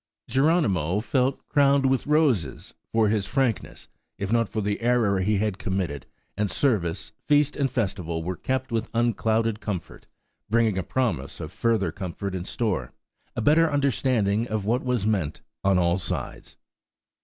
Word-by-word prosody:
Geronimo 110 - +2
felt 130 +4 0
crowned 140 -1 +3
with 135 0 +1
roses, 135 - +1 0.2
for 110 -2 +3
his 105 -2 0
frankness, 130 -6 -1 0.3
if 100 +1 -3
not 115 -2 +2
for 110 - -3
the 100 +1 -2
error 115 -5 +2
he 105 +3 +1
had 100 -1 -1
committed; 90 -9 -3 0.3
and 105 0 0
service, 100 - 0 0.2
feast, 145 0 +3
and 140 -2 0
festival 90 -9 -2
were 90 +2 -3
kept 130 +3 -2
with 115 0 -1
unclouded 115 -1 +1
comfort, 95 -7 -6 0.4
bringing 115 -2 +2
a - - 0
promise 90 - -2
of - - -6
further 110 -7 +1
comfort 95 +2 -5
in 90 -1 -4
store–a 115 +1 -4
better 160 +6 +4
understanding 120 -6 +1
of 110 -3 -2
what 120 +4 +1
was 125 -5 0
meant 95 -9 -1 0.2
on 95 -1 +3
all 85 +1 +2
sides. - - -5
110 Hz, 150 wpm, -25 LUFS, 95-130 Hz, 0.4 s, better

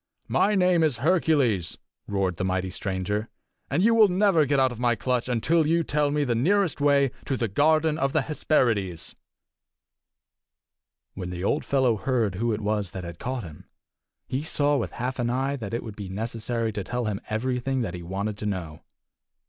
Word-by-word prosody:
"My 210 +1 +3
name 180 -3 +3
is 155 -7 +2
Hercules!" 145 - +2 0.3
roared 95 -4 -1
the - - -2
mighty 95 0 -1
stranger, 100 +4 -2 0.4
"and 180 - +1
you 230 +2 +5
will 220 -2 +7
never 180 -5 +3
get 140 0 +2
out 130 -1 +3
of 120 - -8
my 120 -1 +2
clutch 125 +2 -1
until 150 +7 +2
you 165 +1 +2
tell 150 -1 +1
me 145 0 +1
the 125 -4 0
nearest 175 - +1
way 140 -2 +4
to 135 - -1
the 115 - 0
garden 155 +7 +2
of 135 -2 +1
the 155 -1 +1
Hesperides." 115 - 0 2.0
When 90 -2 -6
the 90 0 -5
old 145 +9 +1
fellow 130 -5 +2
heard 115 -4 0
who 115 +5 -1
it 110 0 -2
was 105 -3 -1
that 95 - -5
had 85 -1 -8
caught 125 -1 -3
him, 80 -4 -12 0.6
he 130 - -2
saw 145 -1 +1
with 130 - -2
half 130 +2 -4
an 120 -1 0
eye 135 +3 0
that 110 -6 -6
it 115 - -3
would 110 -3 -8
be 100 -3 -7
necessary 115 +2 -2
to 100 -1 -3
tell 125 +4 -3
him 105 -2 -2
everything 125 +4 -1
that 100 -7 -3
he 90 - -6
wanted 100 +4 -4
to 105 - -3
know. 85 -6 -4
120 Hz, 190 wpm, -26 LUFS, 100-145 Hz, 2.0 s, will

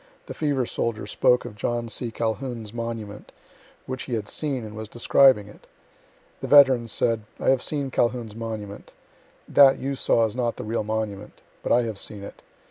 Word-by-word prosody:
The - - -7
fever 145 -5 0
soldier 115 -3 -2
spoke 125 +4 +2
of 115 -4 -8
John 120 +2 -2
C. 120 +1 -2
Calhoun's 115 -1 -4
monument, 115 -3 -6 0.5
which 130 0 -5
he 125 - -2
had 105 -2 -4
seen, 135 -6 -2
and 105 0 -9
was 110 0 -6
describing 120 -1 +4
it. 105 - -16 0.7
The - - -5
veteran 135 -5 +6
said: 115 0 0 0.2
"I - - +3
have 135 -2 +2
seen 140 -3 -2
Calhoun's 120 -3 0
monument. 110 -3 -7 0.5
That 135 -1 +6
you 140 +1 -3
saw 115 -3 +2
is 110 0 -4
not 120 -2 -1
the - - -5
real 110 +1 -2
monument. 105 -1 -4 0.2
But - - -3
I 120 - +4
have 110 -3 -5
seen 100 -2 -6
it. - - -10
115 Hz, 180 wpm, -24 LUFS, 110-130 Hz, 0.7 s, veteran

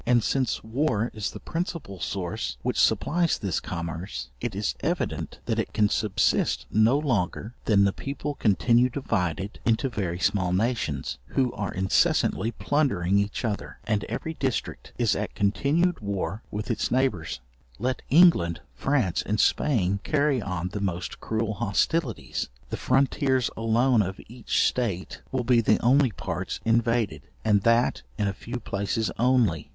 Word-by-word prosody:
And 120 -1 +3
as 130 -3 0
war 115 -1 0
is 105 -2 -3
the - - -9
principal 165 - -4
source 85 -5 -3
which - - 0
supplies 170 0 +2
this 95 -6 -1
commerce, 85 -6 -5
it - - -3
is - - -1
evident - - -2
that - - 0
it - - -2
can 105 -1 +3
subsist 105 -2 +1
no 110 +5 +4
longer 115 - -1
than 100 -3 +4
the 100 -1 +2
people 145 +1 -4
continue 120 +1 +3
divided 100 - -2
into 115 +4 +1
very 95 -7 -2
small 90 -1 +1
nations, 90 - -1
who 130 -3 0
are 100 -3 -3
incessantly 95 +2 +2
plundering 100 - +1
each 100 +4 -2
other, 105 -3 -3
and 105 -2 0
every 125 +9 -4
district 135 -5 -3
is - - +2
at - - -4
continued 145 - +1
war 100 -1 -3
with 105 +3 -3
its 115 - -1
neighbours. 100 - 0 0.4
Let 125 +3 -1
England, 140 - +5
France, 130 -11 +1
and 105 +1 -1
Spain 100 -9 +2
carry 145 -4 +1
on 90 -3 -3
the 105 +2 -5
most 90 -3 -3
cruel 110 -1 -1
hostilities, 115 - -1 0.2
the - - -1
frontiers 130 -2 +1
alone 115 +2 +3
of 95 -1 -3
each 120 +1 0
state 100 -8 -2
will 130 -2 0
be 120 -1 +4
the 110 -1 +3
only 130 +2 +4
parts - - -4
invaded, 115 -1 +1 0.2
and 105 -2 +4
that 115 +3 +3 0.2
in 105 - 0
a 100 - -1
few 120 +5 -6
places 105 +1 -2
only. 120 - +2
110 Hz, 150 wpm, -26 LUFS, 95-130 Hz, 0.4 s, England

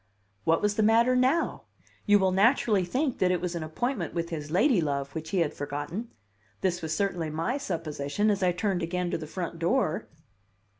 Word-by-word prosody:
What 165 +3 +2
was 210 0 +1
the - - +3
matter 230 +4 +4
now? 260 +7 +1 0.4
You 205 0 +7
will 190 -2 +2
naturally 205 0 +3
think 260 - -1
that 185 - +3
it 180 -1 +1
was 180 0 -3
an 170 - -3
appointment 240 - -3
with 170 0 -2
his 150 -3 -5
ladylove 160 - +1
which 160 0 -5
he 185 0 +1
had 155 - 0
forgotten; 145 +11 -5 0.5
this 180 -2 0
was 160 -1 -2
certainly 180 -5 -1
my 165 - -2
supposition 165 - -1
as 200 -1 -1
I 180 -1 +3
turned 180 0 -1
again 175 +1 -2
to - - 0
the 155 - -7
front 170 0 -5
door. 170 -1 0
180 Hz, 190 wpm, -28 LUFS, 160-215 Hz, 0.5 s, You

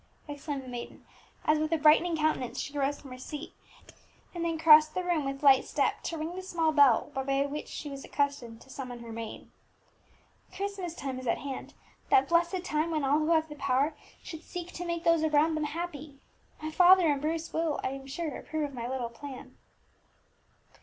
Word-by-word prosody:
exclaimed 290 -1 -5
the - - -12
maiden, 245 -1 -8 0.4
as 305 0 +3
with 310 +1 -1
a 330 - +3
brightening 315 +2 +4
countenance 265 -5 0
she 285 - -5
rose 285 0 0
from 270 - -12
her 255 - -9
seat, 295 +4 -7 0.8
and 345 -1 -3
then 330 -1 -1
crossed 310 -1 +7
the 365 - -1
room 345 -5 0
with 275 +1 -4
light 270 -2 +7
step - - 0
to 330 - -4
ring 320 +3 -4
the 375 - -5
small 340 -4 0
bell 285 -6 +4
by 275 +1 0
which 290 +1 -5
she - - -7
was 275 -1 -7
accustomed 275 -6 -2
to - - -17
summon 250 -3 -7
her 230 - -9
maid. 225 -1 -7 1.1
"Christmas 390 -4 -4
time 270 -5 -4
is 255 - -7
at 230 - +2
hand, 275 -2 -7 0.3
that 405 -2 +5
blessed 345 +2 +2
time 310 -1 0
when 310 -3 -1
all 285 +3 +3
who 310 +1 0
have 320 -1 +3
the 300 - -8
power 280 +1 +1 0.3
should 320 -3 -8
seek 355 -1 -7
to 355 - -6
make 340 -1 -2
those 335 -1 +4
around 310 +1 +3
them 310 -1 -1
happy. 300 -3 -6 0.4
My 310 0 -5
father 360 +2 +7
and 290 -3 +2
Bruce 325 +2 -2
will, 320 -2 0
I - - 0
am 270 0 -7
sure, 310 +3 -4
approve 310 -2 -3
of - - -11
my 235 -1 -4
little 250 -2 -3
plan." 260 +3 -10
300 Hz, 200 wpm, -29 LUFS, 275-330 Hz, 1.1 s, crossed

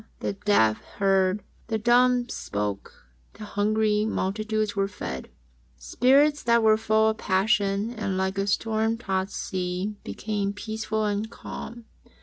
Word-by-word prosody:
The - - -1
deaf 195 - +2 0.2
heard. 195 0 +2 0.2
The 220 -1 0
dumb 245 +2 +3
spake. 100 - -3 0.5
The 215 - -10
hungry 210 +1 +1
multitudes 215 +1 -1
were 195 -1 +1
fed. 65 - -6 0.5
Spirits 270 - +3
that 235 -1 +3
were 215 0 +6
full 220 0 +2
of 220 - -3
passion 200 +2 +1
and 210 -5 -3
like 190 +1 -1
a 195 - 0
storm 220 +2 0
tossed 190 -4 -2
sea, 185 +3 -3
became 205 -2 -3
peaceful 220 +1 -3
and 210 +1 -1
calm. 235 0 -8
210 Hz, 135 wpm, -26 LUFS, 195-220 Hz, 0.5 s, were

